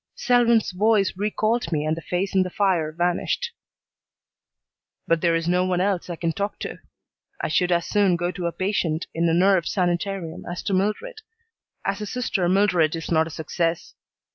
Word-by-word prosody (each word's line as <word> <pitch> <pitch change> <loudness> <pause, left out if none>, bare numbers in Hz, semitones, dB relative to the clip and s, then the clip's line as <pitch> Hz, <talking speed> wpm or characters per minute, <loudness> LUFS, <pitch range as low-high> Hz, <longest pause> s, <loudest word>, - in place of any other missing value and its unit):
Selwyn's 240 - +3
voice 205 +1 +2
recalled 215 +1 0
me 150 -2 0
and 155 +1 +1
the 165 - -7
face 180 +5 -2
in 190 - +4
the 185 - -1
fire 180 -5 +1
vanished. 175 - -1 1.5
"But 165 -1 +1
there 170 -1 +3
is 165 0 -1
no 180 +1 +2
one 185 -1 0
else 190 -2 0
I 175 - -3
can 165 -1 -2
talk 200 +3 -3
to. - - -5 0.6
I - - -2
should 180 0 +1
as 170 -1 +2
soon 200 -4 +2
go 175 +1 -1
to 180 -1 -3
a - - -1
patient 180 -4 -1
in 165 +1 +1
a - - +2
nerve 185 -1 +3
sanitarium 175 -1 -2
as 175 +1 -5
to 200 - -1
Mildred. 215 - -1 0.6
As 195 +1 -1
a 210 - -4
sister 200 -7 -1
Mildred 180 -5 +3
is 165 +1 -6
not 160 -1 +3
a - - -7
success. 165 +1 -2
180 Hz, 185 wpm, -24 LUFS, 170-200 Hz, 1.5 s, in